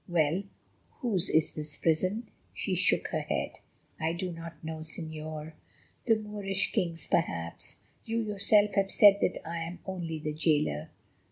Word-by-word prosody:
Well, 170 0 +2 0.6
whose 205 -8 +1
is 160 0 +3
this 150 -1 -4
prison?" 185 +8 +1 0.3
She - - -1
shook - - +2
her - - 0
head. - - -2 0.4
"I 160 +1 0
do 180 +1 -3
not 165 -1 -9
know, 160 0 -4
Señor. 155 -1 -5 0.5
The 225 - +6
Moorish 205 -3 -1
king's 170 -6 -1
perhaps—you 125 - -2
yourself 210 -1 +4
have 195 -1 +2
said 200 -1 +7
that - - +2
I 170 +1 -3
am 170 +2 -5
only 175 -4 -3
the 150 0 -3
jailer." 150 - +1
165 Hz, 145 wpm, -30 LUFS, 155-195 Hz, 0.6 s, said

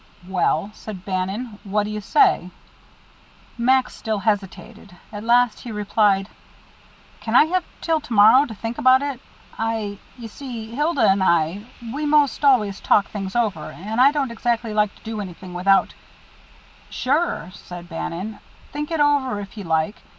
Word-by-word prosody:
"Well," 190 0 0
said 195 -5 -9
Bannon, 200 +4 -3
"what 205 +1 0
do 210 - -5
you 210 0 -4
say?" 370 - +3 1.1
Max 255 +2 +2
still 220 -2 -2
hesitated. 205 0 -3 0.2
At 205 0 -6
last 240 0 +3
he 240 - -8
replied: 205 -2 +1 0.9
"Can 225 +1 -3
I - - +9
have 360 +2 0 0.2
till 325 -1 +1
to 300 - -14
morrow 225 +7 +7
to 220 - -8
think 225 +5 -5
about 260 -1 +5
it? 275 -3 -4 0.4
I 220 -3 -2 0.2
you 235 -2 -8
see, 230 -2 -8
Hilda 295 +3 +2
and 195 0 +3
I, 170 +5 +1 0.3
we 300 +2 -2
most 295 -1 +2
always 220 -8 +3
talk 200 - +2
things 195 -1 -5
over, 210 -10 0
and 215 +9 -3
I 275 +2 +7
don't 280 -4 -1
exactly 230 -1 -1
like 210 -1 +1
to - - -22
do 220 -1 -4
anything 185 -1 -9
without 195 +2 +2 0.5
" - - -27 0.2
"Sure," 275 - 0
said 175 -3 -10
Bannon; 180 +5 -5 0.3
"think 295 +1 -4
it 325 -2 -2
over 285 -6 +2
if 200 0 -9
you 205 -3 -7
like. 160 +4 -1
220 Hz, 165 wpm, -22 LUFS, 195-255 Hz, 1.1 s, I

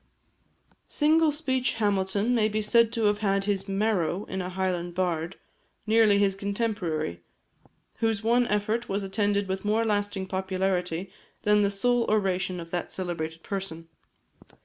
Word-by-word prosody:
Single 315 +1 +3
speech 260 -5 -1
Hamilton 205 +1 +1
may 220 -3 +3
be 215 0 -1
said 230 +2 +3
to 230 - -1
have 205 0 +2
had 195 -2 +1
his 200 -1 -1
marrow 195 -2 0
in 190 - -4
a 180 - -4
Highland 180 -2 -2
bard, 175 -1 -1 0.5
nearly 220 -2 +5
his 200 -1 +3
contemporary, 195 - -2 0.8
whose 225 -2 0
one 240 +2 +3
effort 215 +3 -1
was 200 +1 -1
attended 200 0 0
with 190 0 -3
more 215 +2 +1
lasting 205 -2 -1
popularity 185 -1 -2 0.3
than 210 0 +4
the 200 - +3
sole 235 +4 +2
oration 190 -3 0
of 165 0 -9
that 175 - -3
celebrated 165 -3 -4
person. 180 -5 -5
200 Hz, 145 wpm, -27 LUFS, 185-220 Hz, 0.8 s, nearly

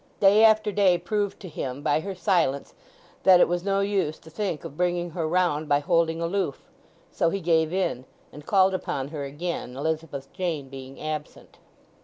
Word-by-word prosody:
Day 205 +2 +6
after 215 -1 +5
day 195 -3 +4
proved 205 +1 -2
to 190 - -8
him, 140 -4 -5
by 145 - +2
her 195 +4 -5
silence, 170 -7 0 0.5
that 185 -2 +7
it - - +6
was 175 0 -1
no 195 0 +1
use 195 -6 0
to 160 - -16
think 175 -3 -3
of 140 - -8
bringing 175 0 -1
her 165 -1 -2
round 160 -3 +1
by 145 - +5
holding 165 +1 +1
aloof; 170 -3 -2 0.4
so 165 - +1
he 195 - -2
gave 160 -2 +2
in, 175 -9 -1 0.3
and 150 - -10
called 190 -1 +4
upon 140 -7 -3
her 145 -2 -5
again, 145 -3 -5
Elizabeth 150 -2 -4
Jane 170 -7 -3
being 135 0 -10
absent. 155 -1 -6
170 Hz, 180 wpm, -25 LUFS, 150-190 Hz, 0.5 s, that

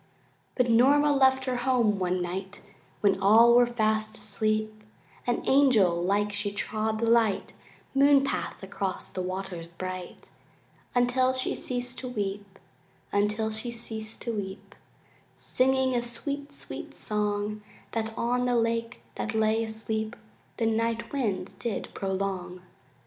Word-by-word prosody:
But 250 -1 +2
Norma 280 +6 +5
left 265 -1 +4
her 255 -2 -1
home 245 -5 +2
one 180 -1 0
night 190 +3 -5 0.4
When 195 -2 +3
all 225 +4 +7
were 245 0 +6
fast 215 -2 0
asleep 215 +1 -1 0.4
And 240 - -1
angel 220 -11 +4
like 205 +2 +1
she 205 0 -2
trod 215 +2 -2
the 230 - 0
light 225 -4 +2 0.4
Moonpath 275 -5 +3
across 195 -1 -4
the 185 - -3
waters 185 -2 -4
bright 185 +1 -7 0.6
Until 250 +1 +3
she 260 0 -1
ceased 245 0 -4
to 255 - -5
weep, 200 -3 -4 0.5
Until 210 +2 +1
she 220 +3 -4
ceased 220 -2 -7
to 235 - -2
weep, 195 -3 -6 0.6
Singing 265 0 +1
a 240 - +1
sweet, 280 +5 -4
sweet 285 - -8
song 210 0 -1 0.3
That 225 -1 -2
on 245 +1 +1
the 245 - +2
lake 230 +1 -1
that 215 - -3
lay 220 +1 +2
asleep 220 0 -3 0.4
The 230 - 0
night 230 +1 0
wind 210 -8 -2
did 230 -4 -3
prolong. 190 -2 -3
220 Hz, 135 wpm, -28 LUFS, 200-245 Hz, 0.6 s, all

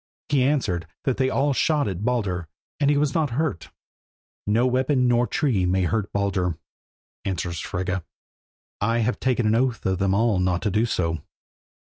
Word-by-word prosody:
He 140 -2 +3
answered 110 - 0 0.2
that 130 - 0
they 130 -1 +2
all 140 +2 +1
shot 150 0 +2
at 95 0 -4
Baldur 100 -8 -1 0.3
and 145 -1 +3
he 145 - +3
was 145 -1 +1
not 155 -3 +1
hurt. 145 - -1 0.8
"No 115 +4 +3
weapon, 130 +1 +2
nor 120 0 +3
tree 120 -11 +1
may 90 +1 +2
hurt 100 +3 -1
Baldur," 95 -4 0 0.7
answers 85 -3 -3
Frigga, 95 0 -3 0.8
"I 115 +3 +2
have 125 - -1
taken 125 -3 +1
an 110 - +3
oath 120 0 0
of 95 -1 0
them 95 -1 +2
all 110 -2 +2
not 90 -1 0
to 105 - +1
do 110 +4 +2
so." 85 -6 -1
110 Hz, 170 wpm, -24 LUFS, 95-130 Hz, 0.8 s, He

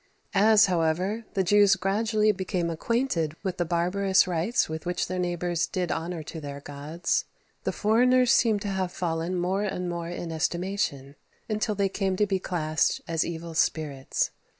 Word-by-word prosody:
" - - -37 0.2
As, 215 -1 +7
however, 185 +5 0
the 190 - +2
Jews 205 +1 +5
gradually 215 +3 +1
became 185 -3 -2
acquainted 170 - -1
with 190 -2 -2
the 175 - 0
barbarous 185 +3 +2
rites 180 +8 +1
with 160 0 -5
which 180 0 -1
their 185 +1 -3
neighbours 175 -1 -1
did 180 -2 -2
honour 165 0 -3
to 160 +1 -8
their 140 -1 -6
gods, 145 +4 -2 0.4
the - - +1
foreigners 250 +3 +3
seem 225 -3 +4
to 205 - -4
have 190 -2 -1
fallen 170 0 -2
more 180 +3 0
and 185 -3 -2
more 170 -1 -4
in 175 -1 -5
estimation, 160 -4 -2 0.3
until 215 0 -1
they 200 0 +2
came 195 -1 -1
to 210 - +2
be 195 -2 0
classed 155 -4 0
as 165 -1 +1
evil 170 0 -6
spirits. 150 -4 0
180 Hz, 170 wpm, -27 LUFS, 165-200 Hz, 0.4 s, As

